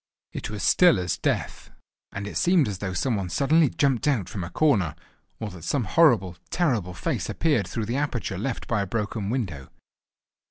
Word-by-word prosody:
It -, -, -5 dB
was 105 Hz, -3 st, -5 dB
still 180 Hz, -2 st, +5 dB
as 90 Hz, -2 st, -1 dB
death, -, -, -2 dB, 0.4 s
and 100 Hz, 0 st, -5 dB
it 105 Hz, -, -7 dB
seemed 175 Hz, -5 st, +3 dB
as 100 Hz, -3 st, -4 dB
though 100 Hz, -2 st, -3 dB
some 115 Hz, +4 st, 0 dB
one 95 Hz, -2 st, -3 dB
suddenly 145 Hz, -, +3 dB
jumped 135 Hz, -1 st, +1 dB
out 120 Hz, -11 st, +1 dB
from 95 Hz, -5 st, -5 dB
a 85 Hz, -, -5 dB
corner, 100 Hz, -, +2 dB, 0.4 s
or 110 Hz, -2 st, -4 dB
that 90 Hz, -3 st, -11 dB
some 135 Hz, -, 0 dB
horrible, 105 Hz, -, +3 dB
terrible 115 Hz, -, 0 dB
face 80 Hz, -, -2 dB
appeared 145 Hz, -, +1 dB
through 110 Hz, +4 st, -3 dB
the 120 Hz, +5 st, -2 dB
aperture 125 Hz, -9 st, -2 dB
left 120 Hz, +4 st, -3 dB
by 115 Hz, -4 st, 0 dB
a 100 Hz, -, -3 dB
broken 105 Hz, -1 st, -3 dB
window. 95 Hz, -, -3 dB
110 Hz, 190 wpm, -25 LUFS, 95-140 Hz, 0.4 s, still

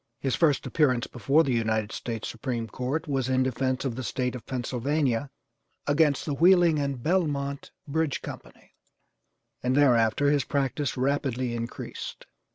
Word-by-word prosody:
His 135 Hz, -2 st, -1 dB
first 150 Hz, -5 st, +2 dB
appearance 130 Hz, -6 st, +2 dB
before 140 Hz, +6 st, +2 dB
the 135 Hz, -, 0 dB
United 110 Hz, -2 st, 0 dB
States 115 Hz, -2 st, -4 dB
Supreme 120 Hz, -1 st, -3 dB
Court 130 Hz, +9 st, -3 dB
was 135 Hz, -3 st, -1 dB
in 130 Hz, 0 st, +3 dB
defence 130 Hz, +1 st, -1 dB
of 125 Hz, -4 st, -2 dB
the 130 Hz, -, -4 dB
State 125 Hz, 0 st, -2 dB
of 125 Hz, -, -9 dB
Pennsylvania 130 Hz, +1 st, -1 dB, 0.6 s
against 145 Hz, -1 st, +2 dB
the 150 Hz, -, -1 dB
Wheeling 170 Hz, 0 st, +5 dB
and 140 Hz, -4 st, -2 dB
Belmont 145 Hz, -5 st, 0 dB, 0.2 s
Bridge 155 Hz, 0 st, -1 dB
Company, -, -, -10 dB, 0.9 s
and 130 Hz, +2 st, +1 dB
thereafter 125 Hz, 0 st, +4 dB
his 145 Hz, -2 st, +2 dB
practice 140 Hz, -1 st, -1 dB
rapidly 130 Hz, -2 st, 0 dB
increased. 115 Hz, 0 st, -6 dB
135 Hz, 145 wpm, -27 LUFS, 125-145 Hz, 0.9 s, Wheeling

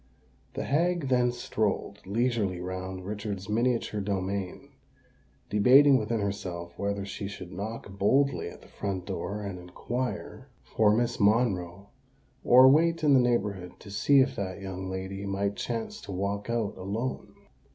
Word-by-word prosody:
The -, -, -2 dB
hag 165 Hz, 0 st, +1 dB
then 125 Hz, -1 st, +3 dB
strolled 105 Hz, -4 st, -2 dB
leisurely 110 Hz, -4 st, 0 dB
round 95 Hz, +1 st, -5 dB
Richard's 100 Hz, -2 st, -5 dB
miniature 115 Hz, -1 st, 0 dB
domain, 95 Hz, -1 st, -3 dB, 0.8 s
debating 130 Hz, +7 st, +6 dB
within 110 Hz, 0 st, -1 dB
herself 90 Hz, -4 st, -4 dB
whether 100 Hz, -1 st, -2 dB
she 100 Hz, 0 st, -5 dB
should 90 Hz, -3 st, -8 dB
knock 105 Hz, +5 st, -5 dB
boldly 135 Hz, +7 st, +2 dB
at -, -, -13 dB
the -, -, -16 dB
front 95 Hz, -3 st, -4 dB
door 100 Hz, +1 st, -4 dB
and 100 Hz, -3 st, -5 dB
inquire 125 Hz, +8 st, -5 dB
for 105 Hz, -2 st, +2 dB
Miss 120 Hz, +2 st, +1 dB
Monroe, 100 Hz, -3 st, +1 dB, 0.5 s
or 130 Hz, +2 st, +8 dB
wait 165 Hz, +4 st, +4 dB
in 145 Hz, -2 st, +5 dB
the 135 Hz, -, +7 dB
neighbourhood 105 Hz, -7 st, 0 dB
to 100 Hz, -, -12 dB
see 135 Hz, +7 st, +4 dB
if 130 Hz, -, +1 dB
that 95 Hz, -1 st, -4 dB
young 95 Hz, -1 st, -5 dB
lady 95 Hz, +1 st, -5 dB
might 100 Hz, 0 st, -1 dB
chance 115 Hz, 0 st, -4 dB
to -, -, -8 dB
walk 100 Hz, +3 st, -3 dB
out 115 Hz, -3 st, -1 dB
alone. 105 Hz, +7 st, -4 dB
100 Hz, 145 wpm, -28 LUFS, 95-120 Hz, 0.8 s, or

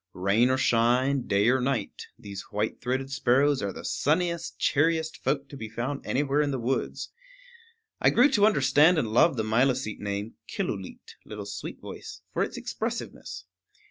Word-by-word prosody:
Rain 100 Hz, +7 st, +2 dB
or 130 Hz, -, +2 dB
shine, 125 Hz, +2 st, +2 dB
day 100 Hz, +1 st, +2 dB
or 130 Hz, +1 st, +3 dB
night, 125 Hz, -5 st, -2 dB
these 100 Hz, -1 st, -8 dB
white 105 Hz, +2 st, -2 dB
throated 130 Hz, +2 st, -2 dB
sparrows 140 Hz, +1 st, +2 dB
are 100 Hz, -, -2 dB
the -, -, -9 dB
sunniest, 170 Hz, +3 st, 0 dB
cheeriest 160 Hz, +1 st, +1 dB
folk 140 Hz, -1 st, 0 dB
to 140 Hz, -, -11 dB
be 110 Hz, -5 st, -7 dB
found 125 Hz, +5 st, -4 dB
anywhere 145 Hz, +2 st, +1 dB
in 145 Hz, -, 0 dB
the 135 Hz, -, -1 dB
woods. 125 Hz, +2 st, -2 dB, 0.9 s
I -, -, +5 dB
grew 245 Hz, +4 st, +5 dB
to 205 Hz, 0 st, +5 dB
understand 155 Hz, -1 st, +4 dB
and 120 Hz, -8 st, 0 dB
love 135 Hz, +3 st, +4 dB
the 110 Hz, -, 0 dB
Milicete 120 Hz, +1 st, +1 dB
name, 100 Hz, +1 st, -4 dB
Killooleet, -, -, -5 dB
Little -, -, -8 dB
Sweet -, -, -7 dB
Voice, -, -, -9 dB
for -, -, -1 dB
its -, -, -2 dB
expressiveness. -, -, -5 dB
130 Hz, 165 wpm, -27 LUFS, 115-145 Hz, 0.9 s, I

